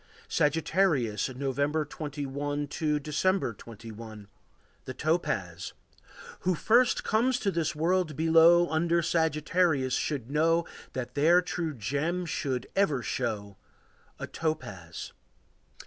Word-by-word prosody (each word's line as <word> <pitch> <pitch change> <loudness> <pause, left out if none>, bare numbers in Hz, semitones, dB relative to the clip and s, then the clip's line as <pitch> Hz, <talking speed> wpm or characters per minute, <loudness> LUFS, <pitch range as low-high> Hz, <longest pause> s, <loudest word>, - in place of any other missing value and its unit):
Sagittarius. 150 - +1
November 140 +4 -1
21 145 0 -4
to 150 -1 0
December 150 0 0
21. 110 -1 -10 0.6
The 130 - -6
Topaz. 100 - -1 0.7
Who 185 0 +1
first 240 +8 +3
comes 240 +4 +2
to 200 -5 0
this 165 -2 -1
world 170 0 +1
below 165 +2 +6
Under 170 +1 +1
Sagittarius 155 -3 +1
should 135 -4 -2
know 165 +3 +2 0.3
That 125 -1 -4
their 160 +6 +5
true 165 -3 -3
gem 150 - -2
should 130 -5 -2
ever 150 -11 +2
show 100 -4 -3 0.6
A - - -5
topaz. 105 - -5
150 Hz, 105 wpm, -28 LUFS, 130-170 Hz, 0.7 s, below